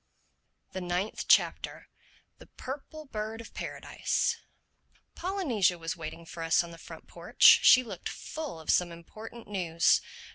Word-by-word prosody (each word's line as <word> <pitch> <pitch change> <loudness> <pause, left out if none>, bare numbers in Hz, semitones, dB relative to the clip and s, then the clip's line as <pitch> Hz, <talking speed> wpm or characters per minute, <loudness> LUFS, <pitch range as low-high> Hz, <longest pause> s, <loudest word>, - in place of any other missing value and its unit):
THE 185 - -5
NINTH 180 +4 -3
CHAPTER - - +2 0.5
THE - - -14
PURPLE 295 +4 -8
BIRD 220 +1 -4
OF 230 - -11
PARADISE - - -2 0.8
POLYNESIA 280 - 0
was 165 0 -4
waiting 165 0 -8
for 165 +1 -9
us 165 +1 +3
in 170 - -10
the 165 - -12
front - - -11
porch. - - +5
She 255 - +7
looked 235 - -6
full 310 - -7
of 160 - 0
some 175 -1 +2
important 215 +7 -11
news. 170 -5 +2
190 Hz, 140 wpm, -29 LUFS, 170-235 Hz, 0.8 s, She